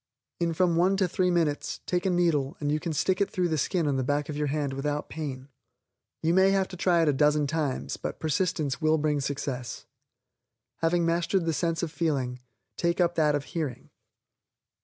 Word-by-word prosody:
In 170 -1 0
from 175 -1 +2
one 185 +3 +3
to 190 -2 +2
three 180 +1 +1
minutes, 165 -4 0
take 180 +1 0
a - - +3
needle, 170 -3 +1
and 145 -1 -1
you 155 - +1
can 170 +1 -3
stick 185 +5 +1
it 200 - +2
through 180 -1 0
the 160 - 0
skin 175 +3 0
on 140 -2 +1
the 130 - 0
back 145 +3 -1
of 150 - -3
the 150 0 -1
hand 145 -1 -1
without 145 +2 -2
pain. 135 -4 -5 0.8
You 165 +1 +3
may 190 +1 +5
have 195 -1 +2
to 185 - -8
try 175 -2 +3
it - - +1
a 145 - +4
dozen 150 +1 +3
times, 145 -3 -2
but - - -5
persistence 155 -2 -1
will 155 0 +3
bring 150 -1 0
success. 135 -3 -4 0.9
Having 170 +1 +1
mastered 170 +2 +1
the 165 - +1
sense 165 0 -1
of 165 - -2
feeling, 135 -7 -1 0.4
take 170 +1 0
up 175 -1 +3
that 150 -3 +2
of 145 - -1
hearing. 145 -6 -5
160 Hz, 200 wpm, -27 LUFS, 145-175 Hz, 0.9 s, may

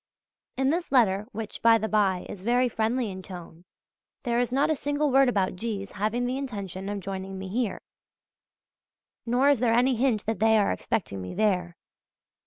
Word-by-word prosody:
In 265 +1 +2
this 340 +2 -2
letter, 210 -6 +3
which, 215 0 -6
by 230 0 +6
the 220 0 -2
bye, 200 -4 +1
is 190 - -8
very 245 +4 +2
friendly 225 0 -1
in 190 0 -7
tone, 175 -2 -11 0.6
there 240 -2 0
is 245 0 0
not 275 +4 +2
a - - +2
single 290 +1 -1
word 270 0 +5
about 195 -6 0
G.'s 200 0 -4
having 215 +5 -1
the 255 +2 -2
intention 200 -7 -5
of 205 -1 -4
joining 195 0 -5
me 190 0 -6
here, 225 +1 -1 1.5
nor 250 +4 +3
is 280 - +2
there 235 -2 +2
any 255 +2 +3
hint 235 -3 +1
that 225 0 -2
they 220 +1 +4
are 205 - +2
expecting 100 - -3
me 90 - -7
there. 180 -4 0
220 Hz, 185 wpm, -26 LUFS, 195-245 Hz, 1.5 s, by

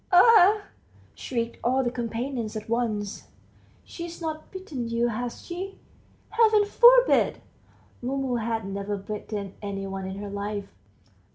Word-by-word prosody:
"Ah!" 415 +1 +7 0.5
shrieked 235 -2 -3
all 260 +2 +2
the 240 - 0
companions 235 -1 -3
at 215 - -5
once, 220 -3 -2 0.6
"she's 340 -1 -8
not 315 -2 -5
bitten 310 - -5
you, 235 +1 +1
has 235 +2 -5
she? 375 +3 -6 0.5
Heaven 435 -2 +5
forbid! - - +5 0.6
(Mumu 260 0 -1
had 225 -1 -2
never 200 +1 -3
bitten 205 0 -5
any 200 -1 -4
one 195 -1 -5
in 190 - -5
her 200 0 -6
life.) 200 0 -4
235 Hz, 125 wpm, -26 LUFS, 210-340 Hz, 0.6 s, Ah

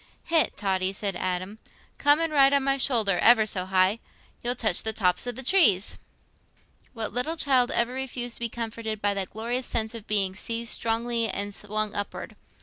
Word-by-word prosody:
"Hegh, 325 -2 +4
Totty," 190 -2 -1
said 195 -1 -2
Adam, 185 +4 -3 0.4
"come 290 +2 +4
and 330 -1 -1
ride 275 -1 +5
on 280 -1 +2
my 275 0 +1
shoulder—ever 225 -2 +4
so 185 -3 -3
high—you'll 195 +5 -1
touch 215 -7 +1
the 220 - +1
tops 180 +1 0
o' - - 0
the 260 +3 -8
trees." 240 - +3 0.9
What 225 -4 -5
little 300 +8 -1
child 260 -5 +3
ever 235 +1 +1
refused 250 -2 -4
to - - -8
be 235 -1 -1
comforted 225 -1 -5
by 205 0 0
that 195 -2 -3
glorious 240 +4 -3
sense 220 -1 -2
of 225 -3 -8
being 195 -3 0
seized 230 +3 -4
strongly 230 0 -1
and 205 0 -4
swung 210 +1 -3
upward? 205 0 -5
225 Hz, 175 wpm, -26 LUFS, 200-245 Hz, 0.9 s, ride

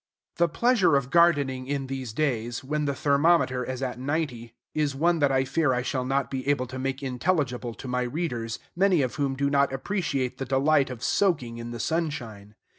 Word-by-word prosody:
The 170 0 +3
pleasure 220 - +3
of 135 -1 0
gardening 145 -7 +3
in 140 -1 -2
these 130 -3 -5
days, 120 -2 -1
when 150 +2 -1
the 140 -1 -1
thermometer 140 -3 +3
is 130 +1 -4
at 125 -1 -3
ninety, 130 -5 -3 0.2
is 150 -3 0
one 170 +4 +2
that 145 -2 +3
I 130 0 +2
fear 150 -1 +1
I 125 0 -1
shall 130 -1 -2
not 135 +1 0
be 135 0 -4
able 140 -3 +2
to 130 +1 -7
make 135 +1 -3
intelligible 125 -3 -1
to 135 - -9
my 125 0 -1
readers, 120 -4 -3 0.2
many 180 -4 +3
of 125 - -2
whom 140 -2 0
do 140 +1 0
not 140 -1 +3
appreciate 135 -4 -2
the 135 - -2
delight 140 +2 +2
of 125 -2 -7
soaking 130 -12 +1
in 115 0 -6
the 120 0 -6
sunshine. 115 -9 -3
135 Hz, 195 wpm, -26 LUFS, 125-150 Hz, 0.2 s, The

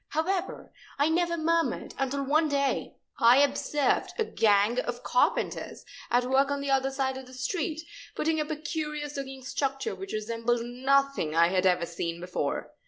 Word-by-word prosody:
However, 360 +4 -2 0.2
I 290 +2 +3
never 340 +1 +1
murmured 330 +1 0
until 275 +1 -1
one 305 +3 +2
day 280 -1 0 0.2
I 235 +2 +7
observed 285 0 +1
a 450 - +2
gang 210 - +3
of 245 -1 -4
carpenters 250 - 0 0.2
at 245 +1 +2
work 270 +2 +3
on 285 0 -1
the 280 0 -2
other 270 0 +2
side 265 -1 -1
of 260 - -11
the 255 - -12
street, 315 +3 -2 0.3
putting 315 0 0
up 300 - -4
a 310 - -1
curious 300 -1 -4
looking 270 -1 -6
structure 275 - -2
which 390 0 -7
resembled 230 +2 -1
nothing 265 - +1
I 170 +1 +5
had 185 0 +2
ever 180 -2 +2
seen 170 0 -4
before. 180 +1 -3
275 Hz, 170 wpm, -28 LUFS, 240-300 Hz, 0.3 s, I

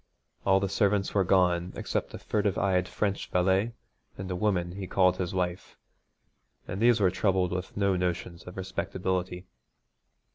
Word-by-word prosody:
All 95 0 +5
the 100 - 0
servants 100 0 +1
were 100 - +3
gone 90 -1 +2
except - - -3
a - - -5
furtive 105 -3 -1
eyed 95 -2 +1
French 100 +1 -2
valet 95 +5 +2 0.4
and 95 0 -5
a - - -1
woman 90 -3 0
he 95 +1 -6
called 90 0 +3
his 90 -1 -2
wife, 90 -2 -3 0.9
and 95 - -4
these 120 0 +5
were 95 -3 +3
troubled 95 -1 +1
with 90 +2 -4
no 100 -1 +2
notions 90 -1 -2
of 90 - -9
respectability. 95 -1 -3
95 Hz, 155 wpm, -28 LUFS, 90-100 Hz, 0.9 s, All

